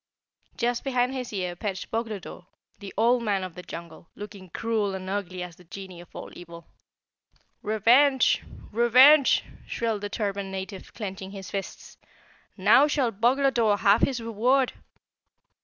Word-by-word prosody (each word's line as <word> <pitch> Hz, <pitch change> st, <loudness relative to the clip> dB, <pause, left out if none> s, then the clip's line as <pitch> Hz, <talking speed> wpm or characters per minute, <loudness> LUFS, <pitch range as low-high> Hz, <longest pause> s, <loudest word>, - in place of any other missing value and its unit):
Just 240 Hz, 0 st, 0 dB
behind 255 Hz, -1 st, 0 dB
his 255 Hz, -2 st, -5 dB
ear 180 Hz, -4 st, -3 dB
perched 190 Hz, 0 st, -5 dB
Boglodore, 215 Hz, -5 st, -5 dB, 0.3 s
the 200 Hz, -1 st, -8 dB
Old 240 Hz, +3 st, +3 dB
Man 200 Hz, -4 st, 0 dB
of 185 Hz, -2 st, -6 dB
the 180 Hz, -, -9 dB
Jungle, 170 Hz, -1 st, -10 dB
looking 205 Hz, -3 st, -10 dB
cruel 215 Hz, 0 st, -1 dB
and 190 Hz, 0 st, -7 dB
ugly 185 Hz, -2 st, -3 dB
as 175 Hz, -2 st, -10 dB
the 180 Hz, -, -17 dB
genie 185 Hz, 0 st, -10 dB
of 175 Hz, -, -14 dB
all -, -, -8 dB
evil. 170 Hz, -1 st, -11 dB, 1.0 s
"Revenge! 245 Hz, +6 st, +4 dB, 0.3 s
Revenge!" 255 Hz, +6 st, +6 dB, 0.2 s
shrilled 225 Hz, -3 st, -2 dB
the 205 Hz, -, -4 dB
turbaned 200 Hz, -2 st, -3 dB
native, 190 Hz, 0 st, -7 dB
clenching 195 Hz, -3 st, -6 dB
his 195 Hz, -1 st, -9 dB
fists. 195 Hz, -1 st, -7 dB, 0.6 s
"Now 215 Hz, +9 st, +6 dB
shall 275 Hz, -5 st, +1 dB
Boglodore 235 Hz, -1 st, +2 dB
have 200 Hz, +2 st, +4 dB
his 260 Hz, -3 st, +1 dB
reward!" 240 Hz, +4 st, +1 dB
210 Hz, 140 wpm, -26 LUFS, 190-240 Hz, 1.0 s, Revenge